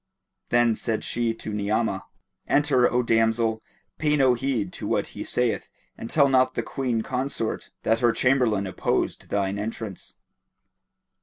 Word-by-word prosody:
Then 120 -1 +3
said 110 -1 -2
she 120 -1 0
to 110 -1 -6
Ni'amah, 105 -1 -1 0.4
"Enter, 140 -4 +3
O 125 0 +2
damsel; 115 -1 +2 0.4
pay 150 -1 +2
no 130 -3 +5
heed 120 -6 -2
to - - -6
what - - +1
he - - -5
saith - - -1 0.3
and 115 - -7
tell 140 -3 +4
not 130 -1 +3
the - - -1
Queen 125 -4 -2
consort 125 -3 -3
that 115 +1 +2
her 120 -1 +4
Chamberlain 120 -6 +2
opposed 95 - -2
thine 100 0 -1
entrance." 105 -2 -6
115 Hz, 145 wpm, -25 LUFS, 110-130 Hz, 0.4 s, no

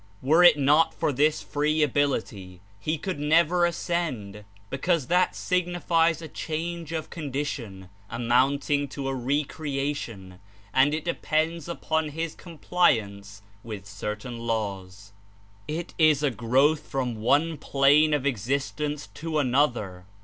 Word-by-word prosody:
Were 160 +6 +5
it 175 -4 +8
not 145 +3 +3
for - - 0
this 150 +4 +2
free 150 +1 +1
ability, 115 -10 -1 0.2
he 155 +10 -1
could 180 0 -4
never 170 +4 +3
ascend, 140 - -3 0.3
because 155 +2 0
that 180 +6 +2
signifies 170 -2 +1
a - - -6
change 165 +2 -5
of 160 -2 -4
condition 135 - -5 0.2
amounting 135 +4 +1
to 135 0 -5
a 135 - -1
re 135 +4 0
crcatlon, 135 -11 -5 0.3
and 140 +3 +4
it 155 - -5
depends 165 -1 -1
upon 160 -2 -1
his 160 +2 -4
compliance 100 - -1 0.2
with 105 -3 -8
certain 105 +3 -6
laws. 100 -4 -4 0.5
It 165 +3 -4
Is 155 -2 +4
a 145 - +2
growth 130 +6 +2
from 125 -4 -2
one 150 +7 +2
plane 145 +3 +4
of 140 -2 -3
ex 120 -7 -2
istence 140 -1 -2
to 160 +5 -3
another. 120 -10 0
145 Hz, 130 wpm, -26 LUFS, 120-160 Hz, 0.5 s, it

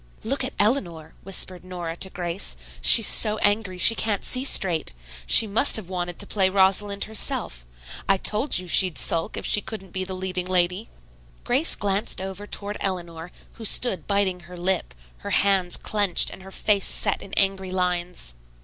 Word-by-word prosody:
"Look 275 +4 -3
at 260 - -6
Eleanor," 180 - -2
whispered 185 -1 -3
Nora 175 -3 -7
to 190 - -1
Grace. 175 - -3 0.2
"She's - - +9
so 215 0 +3
angry 205 -3 0
she 195 +5 +9
can't 215 -3 -3
see 255 0 +2
straight. 175 - +2 0.3
She 225 - +7
must 220 +7 +2
have 210 -5 +1
wanted 175 -2 -5
to - - -6
play 190 -3 0
Rosalind 200 +1 0
herself. - - -4 0.4
I 195 - +3
told 215 +8 +2
you 180 0 -5
she'd 180 -1 +2
sulk 165 -1 0
if - - -5
she 210 - +3
couldn't 195 -5 -10
be 185 - -3
the 190 0 -7
leading 185 -1 -4
lady." 180 +3 -1 0.5
Grace 265 +7 +3
glanced 200 0 -2
over 190 +2 -8
toward 205 0 -5
Eleanor, 175 -3 -4 0.3
who 230 - -11
stood 195 -6 +2
biting 200 -2 -1
her 180 +1 -14
lip, 185 +1 -3 0.2
her - - -8
hands 190 -3 +1
clenched 205 -4 -1
and - - -12
her 190 - -13
face 200 0 -1
set - - +1
in 195 - -12
angry 195 -1 +2
lines. 180 - -4
190 Hz, 175 wpm, -22 LUFS, 180-205 Hz, 0.5 s, She's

